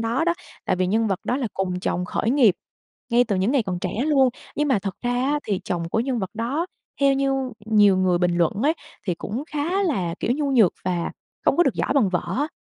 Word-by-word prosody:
đó 235 +7 0
đó, 345 0 +2 0.3
tại - - +1
vì 185 - +1
nhân 220 +4 +1
vật 195 -3 -1
đó 250 - 0
là 265 -4 -1
cùng 180 -1 -2
chồng 180 -1 -1
khởi 215 +4 -1
nghiệp 245 -9 +5 0.6
ngay 245 +1 +4
từ 205 -4 -1
những 190 +7 +1
ngày 275 -5 +3
còn 180 -3 -3
trẻ 185 - -2 0.2
luôn, 270 -4 +4 0.3
nhưng 295 0 +1
mà 250 -6 +3
thật 195 -1 -4
ra 245 0 0
á 270 +4 +1
thì 200 -3 -1
chồng 170 -1 -2
của 220 - 0
nhân 250 0 -1
vật 190 -3 -3
đó 260 +10 -1 0.3
theo 275 -1 +5
như 275 0 +1 0.3
nhiều 205 -3 +5
người 185 -2 +2
bình 175 -1 +1
luận 170 -2 +3
ấy 300 - +4 0.3
thì 180 - +1
cũng 225 - -5
khá 330 +7 0
là, 185 - 0
kiểu, 240 - +1
nhu 285 0 -1
nhược 225 -9 +5
và 175 -2 -1 0.3
không - - +3
có 350 - +6
được 275 - +1
giỏi - - 0
bằng 250 -8 +4
vợ 180 -1 0
á. 290 +4 0
225 Hz, 245 wpm, -23 LUFS, 185-275 Hz, 0.6 s, có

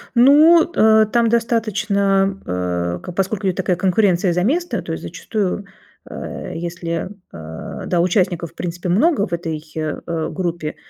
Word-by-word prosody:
Ну, 305 +7 +6
э, 220 0 +5
там 235 +1 +1
достаточно, 205 -4 +1
э, 90 -1 -2
к 180 - -7
поскольку 195 +1 0
такая 185 0 0
конкуренция 185 -2 +2
за 180 +1 0
место, 345 - 0
то - - -7
есть - - -5
зачастую, 205 -2 -3 0.4
э, - - -7
если, 170 0 -4 0.2
э, 80 0 -8
да, 175 -2 +2
участников 180 -2 0
в - - -33
принципе 175 0 -4
много 225 - +3
в 185 - -13
этой, 165 -3 -3
э, 155 -1 -3 0.3
группе, 170 -4 -3
190 Hz, 145 wpm, -19 LUFS, 170-220 Hz, 0.4 s, Ну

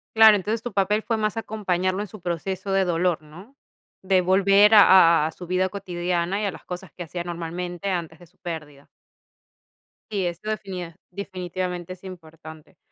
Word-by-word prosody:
Claro, 220 -1 +8
entonces 215 +3 -2
tu 245 - -5
papel 205 +2 +1
fue 225 0 -1
más 215 0 -1
acompañarlo 190 -4 -1
en 210 - -4
su 210 +3 -12
proceso 185 +3 -3
de 195 0 +3
dolor, 175 -1 0
¿no? 175 - -15 0.5
De 190 -1 +3
volver 195 +3 +5
a 170 -6 +7
a - - -5
su 180 - -10
vida 185 +2 0
cotidiana, 180 0 -2
y - - -1
a 200 - -1
las - - -13
cosas 180 +1 -7
que 180 - -8
hacía 175 +1 -5
normalmente 175 +2 -5
antes 165 -3 -3
de 175 - -14
su 160 - -29
pérdida. 150 -4 -8 1.2
Sí, 200 -3 -1
esto 175 +4 -4
definia 185 -6 -5
definitivamente 180 -2 -5
es 185 - -17
importante. 160 -4 -12
185 Hz, 170 wpm, -24 LUFS, 175-200 Hz, 1.2 s, Claro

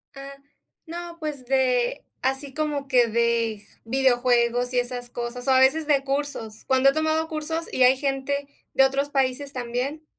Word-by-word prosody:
Ah. 275 0 -9 0.5
No, 340 +1 -7
pues 300 -5 -5
de 250 -2 +1 0.2
así 265 +1 -2
como 295 -2 -2
que 250 -3 +4
de 230 -2 0 0.2
videojuegos 245 -1 +2
y 250 - +3
esas 245 0 -4
cosas, 240 +1 -5
o - - +4
a 260 - +5
veces 295 +4 +3
de 280 -2 +3
cursos. 275 -6 -4
Cuando 265 +1 +4
he 275 - +1
tomado 315 +1 0
cursos 320 +1 -3
y 260 - -1
hay 255 +1 +6
gente 280 +1 -2 0.3
de 270 - +5
otros 275 +2 0
países 275 0 -1
también. 255 +5 -3
265 Hz, 165 wpm, -24 LUFS, 245-285 Hz, 0.5 s, hay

